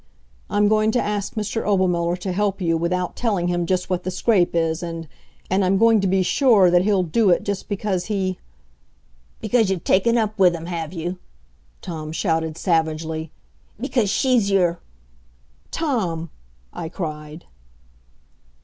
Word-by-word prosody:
I'm 205 0 +2
going 215 0 +3
to 245 - +2
ask 205 -2 -2
Mr. 215 +1 -2
Obermuller 180 -3 +1
to 190 - -3
help 200 +1 -1
you 165 -3 +1
without 175 +2 -1
telling 200 -7 0
him 175 -1 -1
just 180 0 0
what 180 -1 -1
the 185 - -3
scrape 185 -1 +1
is, 165 0 0
and 165 -2 -6 0.4
and 190 +2 +1
I'm 190 +1 +2
going 225 0 +4
to 195 - +1
be 190 0 +2
sure 210 -3 +4
that 175 0 +5
he'll 195 -1 +2
do 200 +5 +2
it 175 - +3
just 200 -1 -4
because 195 -3 -2
he 190 -3 -2 0.5
" - - -37
"Because 225 -5 +2
you've 190 -4 -2
taken 230 +5 +3
up 215 -2 -1
with 180 -2 +5
him, 165 0 -7
have 165 -3 -4
you?" 175 +1 -5 0.6
Tom 155 -3 -6
shouted 160 -2 -1
savagely. 160 -2 -1 0.5
"Because 245 -4 0
she's 245 -3 +2
your 180 -3 +2 0.5
" - - -36
"Tom!" 185 - -2 0.4
I 160 - -5
cried. 155 -2 -6
180 Hz, 160 wpm, -22 LUFS, 165-205 Hz, 0.6 s, that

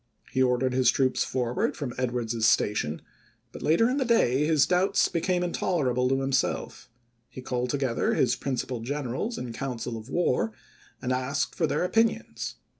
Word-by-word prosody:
He 130 - +1
ordered 130 0 +2
his 130 -2 +4
troops 130 0 +2
forward 125 -1 -1
from 130 -4 -4
Edwards's 120 -3 0
Station; 90 -9 +1 0.5
but - - -10
later 170 +9 +3
in 255 +3 0
the 275 - +2
day 150 - +3
his 155 -4 +4
doubts 180 +4 +2
became 180 +1 0
intolerable 135 -8 0
to 135 0 +1
himself; 135 0 -1 0.4
he - - -10
called 125 -1 -2
together 135 -3 0
his 120 - +2
prin 135 -2 -3
cipal 125 -1 -4
generals 145 - -3
in 120 -2 -5
council 125 -2 -4
of 110 +3 -10
war, 125 -9 +1 0.5
and 125 - -1
asked 130 +2 -1
for 160 - 0
their - - 0
opinions. 225 +5 0
130 Hz, 165 wpm, -27 LUFS, 125-155 Hz, 0.5 s, his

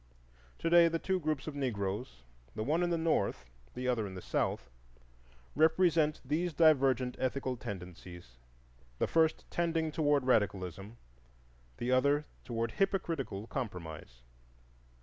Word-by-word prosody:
To - - -3
day 170 0 +7
the 165 0 0
two 190 +2 -1
groups 155 -4 -2
of 155 - -5
Negroes, 100 - -3 0.3
the 110 - -2
one 155 +8 +1
in 175 - +1
the 170 - +1
North, 160 - 0 0.3
the 125 0 -3
other 115 -4 0
in 95 - -8
the - - -5
South, 60 - -1 0.9
represent 160 -1 +3
these 170 +3 -1
divergent 135 -5 +3
ethical 130 0 -1
tendencies, 90 - -9 0.6
the - - +1
first 160 -1 +2
tending 165 -2 0
toward 145 -3 +2
radicalism, 100 -3 0 0.8
the 120 +1 -2
other 140 +3 +3 0.2
toward 115 -2 -2
hypocritical 165 - -1
compromise. 80 - -6
130 Hz, 130 wpm, -32 LUFS, 100-160 Hz, 0.9 s, day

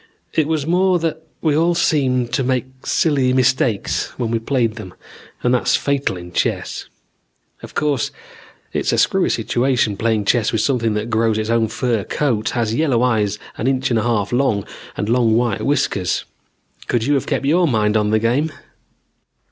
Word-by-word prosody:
It 155 -2 +1
was 155 -3 -1
more 180 +2 +3
that 160 -1 -2 0.2
we 155 -3 +2
all 170 +2 +2
seemed 130 -7 +1
to 135 - +1
make 130 0 -3
silly 135 -5 +2
mistakes 130 -4 +1
when 120 -3 -2
we 115 - +1
played 115 -1 0
them 95 -5 -9 0.5
and 125 - +2
that's 125 - +2
fatal 140 -9 -1
in 90 0 -10
chess. - - -2 0.7
Of - - -11
course 145 -6 0 0.6
it's - - 0
a - - +1
screwy - - +2
situation, 120 -4 +1
playing 110 -2 0
chess 110 +1 +2
with 110 - 0
something 115 -5 0
that 110 +2 -3
grows 110 -1 +2
its 110 +1 -1
own 115 -1 +2
fur 115 -1 -1
coat, 115 -5 -1
has 115 -2 0
yellow 125 -3 +2
eyes 105 -4 +1 0.2
an 120 - -1
inch 130 -1 0
and 115 - +2
a - - 0
half 110 -4 0
long 120 -6 +1 0.3
and 105 - -2
long 115 -1 +3
white 120 -4 0
whiskers. 100 -10 0 0.6
Could 120 - 0
you 145 - +2
have 135 - 0
kept - - -1
your 170 +5 +3
mind 110 -5 +1
on 105 -1 +2
the 110 - +3
game? 125 +8 +1
120 Hz, 180 wpm, -19 LUFS, 110-140 Hz, 0.7 s, more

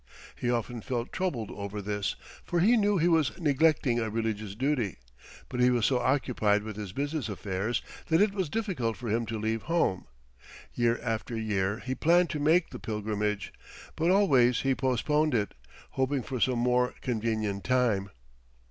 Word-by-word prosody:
He 120 - -2
often 120 0 -1
felt 120 0 -3
troubled 140 - -2
over 100 +1 -5
this, 105 0 -2 0.3
for 175 - -1
he 215 +8 +5
knew 205 -3 +3
he 170 0 +3
was 160 -5 +2
neglecting 145 -5 +2
a 110 -1 -1
religious 110 -2 -3
duty, 125 -5 0 0.5
but 125 - -5
he 125 0 +5
was 120 -3 +2
so 130 -2 +2
occupied 120 -5 +1
with 110 -1 -6
his 105 -3 -6
business 145 +2 -2
affairs 100 +3 -2 0.2
that 160 0 +3
it 205 -1 +3
was 190 -6 -2
difficult 175 - -2
for 120 -2 -5
him 115 +2 0
to 115 0 -3
leave 110 +1 -1
home. 165 - +1 0.7
Year 120 -1 +1
after 115 0 -2
year 100 -2 0
he 130 - -1
planned 170 +4 +3
to 150 - -3
make 160 +4 +3
the - - -7
pilgrimage, 105 -1 -2 0.4
but 165 +2 +1
always 135 -12 +4
he 135 0 +2
postponed 140 +3 +1
it, 105 -3 0 0.4
hoping 130 0 0
for 130 0 -4
some 125 +1 +2
more 125 +1 +2
convenient 110 -4 -1
time. 115 -5 +1
120 Hz, 170 wpm, -29 LUFS, 110-145 Hz, 0.7 s, he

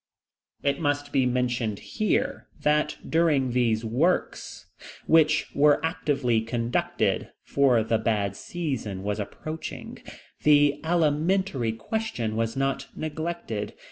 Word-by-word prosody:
It 140 0 +1
must 145 -2 -1
be 130 -3 +2
mentioned 120 -4 0
here, 215 - -1
that 150 0 +1
during 150 -6 +2
these 115 -2 +1
works, 145 +11 -1 0.4
which 160 -1 +4
were 145 +1 +5
actively 140 -8 0
conducted, 115 +1 -1
for 130 -5 +3
the 110 0 +1
bad 105 -3 0
season 130 - -4
was 105 +1 -2
approaching, 155 +10 -6 0.4
the 145 -1 +4
alimentary 160 - +1
question 115 - -3
was 115 +2 -1
not 135 0 -1
neglected. 155 -9 -4
135 Hz, 110 wpm, -26 LUFS, 115-155 Hz, 0.4 s, were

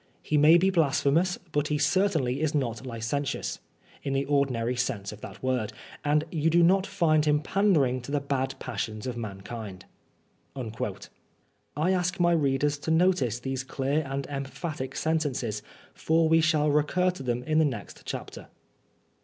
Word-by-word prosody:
He 155 - -1
may 150 +3 +7
be 190 +2 +3
blasphemous, 165 +1 +2
but 145 0 0
he 150 - 0
certainly 155 -4 +1
is 155 0 0
not 130 -2 -2
licentious, 120 +4 -3 0.4
in 140 - -3
the 135 +1 0
ordinary 130 -4 +1
sense 105 -5 -2
of 105 0 -11
the - - -8
word; 125 -5 -1 0.3
and 150 +1 +2
you 160 -1 +1
do 170 +1 +4
not 190 +3 +4
find 160 -6 +2
him 150 -1 +3
pandering 155 -8 +2
to 125 - -8
the 145 - +1
bad 135 -1 -2
passions 110 -4 -4
of 125 -2 -3
mankind." 100 -2 -7 0.7
I 130 - -5
ask 180 0 0
my 175 0 +4
readers 145 -2 +1
to 155 - -5
notice 160 - +3
these 135 +1 -3
clear 135 +3 -1
and 135 0 -3
emphatic 135 0 -5
sentences, 140 -9 -1 0.3
for 160 0 +2
we 160 0 +5
shall 155 -2 +3
recur 165 +5 +2
to 180 - -10
them 125 -1 -2
in 155 +4 +2
the 160 - +5
next 115 -9 -5
chapter. - - -7
145 Hz, 160 wpm, -27 LUFS, 125-160 Hz, 0.7 s, may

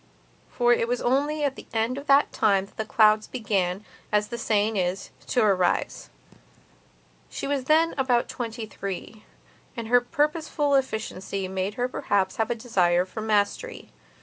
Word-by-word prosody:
For 240 -1 +3
it 230 - 0
was 245 +1 -1
only 290 +4 0
at 280 -2 0
the - - -12
end 225 +2 0
of 280 +1 -8
that 280 +1 +4
time 195 -3 +2
that 220 - -4
clouds 215 -1 +4
began, 200 -5 -2 0.3
as 210 0 +1
the 235 - -4
saying 215 0 +1
is, 185 0 -2 0.2
to 245 - +2
arise. 185 - +1 1.2
She - - -5
was 275 -2 -1
then 320 +3 +3
about 250 -3 +2
twenty 230 -1 -5
three, 200 +1 -7 0.5
and 230 -1 -5
her 245 0 +5
purposeful 295 +2 0
efficiency 210 -7 -2
made 190 +2 -3
her 245 0 0
perhaps 200 -6 -1
have 225 0 0
a 240 - 0
desire 180 -7 +1
for 220 +4 -7
mastery. 215 - -1
225 Hz, 155 wpm, -25 LUFS, 200-255 Hz, 1.2 s, her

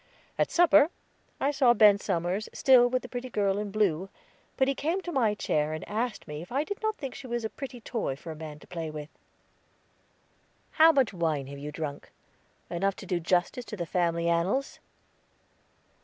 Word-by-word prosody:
At - - +2
supper, 305 -3 +5 0.5
I 280 - +1
saw 260 -4 +4
Ben 210 -2 +6
Somers, 180 +4 -2
still 255 -2 +6
with 255 0 -1
the - - -7
pretty 250 +1 -6
girl 200 -3 0
in 210 -1 -3
blue; 195 -3 0 0.5
but 265 - +3
he 275 - +2
came 325 +7 -1
to 350 - -5
my 230 -8 +2
chair 150 -6 0
and 155 - -6
asked 220 0 -3
me 150 0 -6
if 175 - -11
I 275 +4 +1
did 405 +5 -6
not 435 0 0
think 270 -8 -6
she 275 -2 -9
was 240 -1 -2
a 220 - -3
pretty 260 -3 -7
toy 220 - -3
for 160 +4 -9
a - - -7
man 155 -1 -8
to - - -16
play 165 -3 -5
with. 150 -1 -7 1.6
"How 320 +1 +7
much 270 -8 +2
wine 160 -6 -1
have 140 +1 -9
you 150 +1 -6
drunk? 150 -2 -6 0.6
Enough 195 +3 0
to - - -10
do 180 -1 -1
justice 180 +8 0
to 210 - -7
the 175 - -3
family 170 0 0
annals?" 180 +11 0
205 Hz, 195 wpm, -28 LUFS, 170-255 Hz, 1.6 s, How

